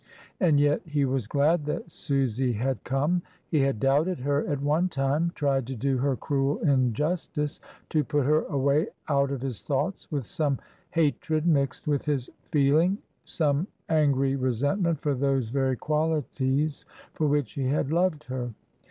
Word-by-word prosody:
And 160 -7 +4
yet 145 0 +3
he 150 -4 0
was 130 -4 -1
glad 150 +4 +2
that 150 +3 -4
Susy 130 -4 0
had 130 +4 -2
come; 145 +7 +1 0.3
he 155 - +2
had 135 -5 +1
doubted 150 - +2
her 145 +2 +1
at 145 - -1
one 150 +6 +1
time, 145 +3 0
tried 135 -4 0
to 135 - -4
do 130 +2 0
her 135 +1 +1
cruel 140 +2 0
injustice, 150 +3 0 0.3
to 155 -2 +2
put 145 -2 0
her 155 +2 +4
away 140 0 +1 0.2
out 140 -2 +2
of 135 -3 -3
his 130 -5 -3
thoughts 150 +8 -2
with 140 -5 -2
some 150 -3 -1 0.3
hatred 155 0 0
mixed 140 -5 +1
with 145 -2 +1
his 140 -5 -1 0.2
feeling, 155 +7 +3 0.3
some 150 +1 0 0.2
angry 140 -4 +3
re 130 -1 0
sentment 160 - 0
for 145 - +1
those 135 -3 0
very 130 0 +1
qualities 150 -1 0 0.3
for 155 - 0
which 145 -5 +1
he 135 -2 -1
had 140 +1 0
loved 170 -2 +1
her. 125 -4 -5
145 Hz, 160 wpm, -27 LUFS, 135-155 Hz, 0.3 s, And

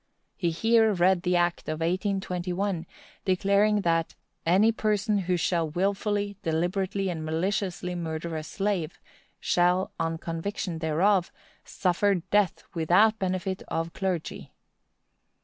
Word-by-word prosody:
He 175 -4 0
here 225 +6 +3
read 180 0 +3
the 180 0 +1
act 175 -2 0
of 155 0 -3
1821, 180 0 -1 0.4
declaring 200 +2 +2
that 165 -2 0 0.3
"any 195 +6 +5
person 210 -1 0
who 180 -1 0
shall 170 -1 0
wilfully, 200 +3 -1
deliberately, 185 +4 -1
and 165 -3 -4
maliciously 180 +3 -2
murder 165 -1 -4
a 155 - -2
slave, 190 0 -2 0.4
shall, 180 +2 +2
on 165 0 -1
conviction 165 +1 -4
thereof, 170 +4 +2 0.3
suffer 195 +2 +1
death 190 +1 +1
without 185 +7 +3
benefit 185 0 -2
of 165 +1 -3
clergy." 185 -4 -3
180 Hz, 115 wpm, -27 LUFS, 170-200 Hz, 0.4 s, any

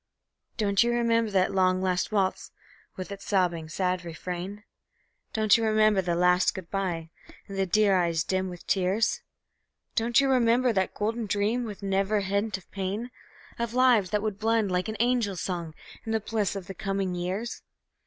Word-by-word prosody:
Don't 200 -3 +2
you 240 - +1
remember 230 -1 +2
that 190 -2 +1
long, 185 -1 +3
last 185 +1 0
waltz, 195 -3 0 0.5
with 185 +1 -7
its 200 0 -7
sobbing, 175 -5 0
sad 180 +1 -1
refrain? 180 +4 -6 0.7
Don't 215 -2 +4
you 230 - +1
remember 215 -2 +3
that 175 -2 -1
last 180 +1 +3
good 185 -3 -8
by, 175 -5 -2 0.4
and 195 - -7
the 195 0 0
dear 205 +1 +3
eyes 170 -3 +1
dim 185 0 -1
with 175 -1 -10
tears? 195 +3 +1 0.7
Don't 235 +2 +3
you 275 - +3
remember 245 -1 +3
that 190 -2 0
golden 225 +1 -2
dream, 210 +5 0
with 210 -2 -8
never 195 +2 +1
a 200 - 0
hint 200 +1 -1
of 190 - -19
pain, 200 +5 -3 0.5
Of 235 0 -2
lives 245 -7 +4
that 210 0 0
would 210 -2 -3
blend 220 -2 +1
like 180 +2 0
an 215 - -4
angel 235 -4 +1
song 170 -3 -4 0.3
in 225 - -3
the 220 - +2
bliss 215 -2 -1
of 195 -2 -5
the 195 - -7
coming 195 -1 -2
years? 185 +7 -3
195 Hz, 180 wpm, -27 LUFS, 185-220 Hz, 0.7 s, Don't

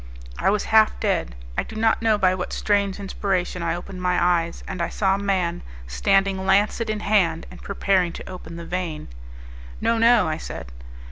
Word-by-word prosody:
I - - +2
was 205 0 +1
half 220 -1 +5
dead; - - -1 0.2
I - - +1
do - - -9
not 220 +1 +2
know 220 -2 +3
by 185 -2 +3
what 180 -1 -4
strange 200 -1 0
inspiration 190 -2 -2
I 165 0 0
opened 180 +1 -8
my 180 0 +1
eyes, 170 -1 +1
and 180 - -4
I 170 - -1
saw 195 -2 +1
a 195 - -1
man, 185 -4 0 0.2
standing 190 - +1
lancet 205 +4 +2
in 215 -1 -2
hand 180 -7 +2
and - - -12
preparing 190 -3 +1
to - - -9
open 180 -3 -9
the 170 0 -7
vein. 175 -4 -4 0.7
"No, 230 0 +1
no!" 230 -2 +5
I 155 0 -1
said. 60 - -8
190 Hz, 190 wpm, -23 LUFS, 175-205 Hz, 0.7 s, half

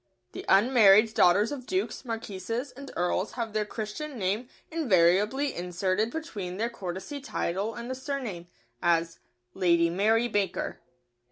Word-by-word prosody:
The - - -7
unmarried 215 0 +6
daughters 200 +4 +4
of 260 -4 -6
dukes, 375 +1 -2
marquises, 230 +1 -4
and 275 +2 -10
earls 180 +3 0
have 230 -3 -4
their 215 -1 0
Christian 235 +7 -5
name 210 +5 -1 0.2
invariably 215 - +3
inserted 185 +4 -1
between 215 - -5
their 230 +3 -1
courtesy 190 - -6
title 205 -4 -2
and 240 +2 -5
surname, 255 - -5 0.3
as: 170 -1 +1 0.3
"Lady 170 -3 +3
Mary 220 +6 +2
Baker." 205 -5 -1
215 Hz, 125 wpm, -28 LUFS, 185-250 Hz, 0.3 s, unmarried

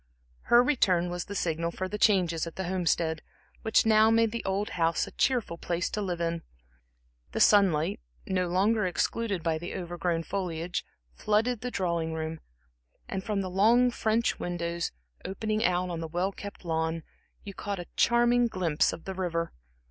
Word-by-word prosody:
Her 240 +1 +7
return 185 -10 +2
was 175 -1 -3
the 200 - -7
signal 170 -2 -1
for 185 +2 -4
the 210 +2 -5
changes 175 -7 +3
at 165 - -8
the 190 - -3
Homestead, 170 -3 0 0.4
which 220 0 +3
now 220 0 +6
made 225 -1 +3
the 235 - -4
old 195 +2 -1
house 165 -1 +1
a - - -10
cheerful 235 -10 0
place 170 0 -2
to 210 - -2
live 180 -4 -2
in. 170 0 -1 0.9
The - - -1
sunlight, 185 -7 +4 0.3
no 185 -1 0
longer 200 +3 +2
excluded 195 +1 -1
by 160 -2 0
the 175 - -6
overgrown 175 -1 -2
foliage, 175 -1 -3 0.3
flooded 220 - +1
the 250 - -3
drawing 170 -6 -1
room, 160 0 -4 0.7
and 190 - -4
from 205 -1 -1
the 185 - -3
long 235 +6 +4
French 225 0 0
windows, 170 -1 -2 0.3
opening 215 +3 -2
out 180 -3 +1
on 170 - -3
the 165 - -4
well 175 +4 -1
kept 200 -1 -9
lawn, 160 0 -1 0.4
you 200 - -8
caught 200 +1 -4
a 175 - -6
charming 240 0 +4
glimpse 175 -8 +1
of 165 - -8
the 190 - -4
river. 170 -3 -2
185 Hz, 170 wpm, -28 LUFS, 170-210 Hz, 0.9 s, Her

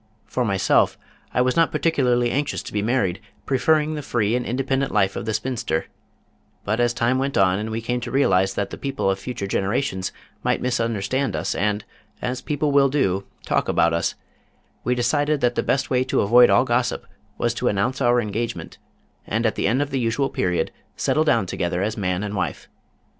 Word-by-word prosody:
For 125 - -1
myself, 95 -4 +2 0.3
I 125 - +2
was 125 0 +1
not 165 -1 +3
particularly 125 -7 +2
anxious 145 +2 -1
to - - -9
be 105 - 0
married, 105 -4 0 0.2
preferring 150 +3 +2
the 150 - -4
free 115 -4 0
and 125 - 0
independent 135 +2 -1
life 100 -2 +2
of - - -4
the 110 - -1
spinster, 115 -12 -2 0.8
but 105 +3 0
as 120 -1 +3
time 120 +2 +1
went 135 +1 -1
on 95 0 +3
and 110 +1 -3
we 110 +1 -3
came 125 +1 -1
to 120 - -5
realize 95 -8 +2
that 100 -1 -2
the - - -7
people 135 -8 -1
of 95 - -3
future 125 -4 -5
generations 95 0 -1 0.3
might - - +1
misunderstand 115 +1 -1
us - - -1
and, 105 +1 -1 0.3
as 125 +1 -3
people 150 0 -1
will 140 -1 +5
do, 100 -9 0 0.2
talk - - 0
about 85 0 +3
us, 85 - 0 0.7
we 125 - +1
decided 145 +5 +1
that 120 0 +2
the - - 0
best 135 - 0
way 125 0 +3
to 130 - +1
avoid 120 +4 +6
all - - +4
gossip 120 0 0 0.3
was 120 -1 0
to 120 +1 -2
announce 120 +7 0
our 120 -1 +4
engagement, 115 +1 -4 0.5
and 115 +3 0
at 110 - +2
the - - 0
end 130 +7 +2
of 145 - -7
the 135 - 0
usual 125 +3 0
period, 90 -1 0 0.3
settle 155 - +2
down 115 -9 +2
together 90 0 -2
as 110 +1 -1
man 90 -2 -1
and 105 0 -4
wife. 95 - -3
120 Hz, 195 wpm, -23 LUFS, 100-130 Hz, 0.8 s, avoid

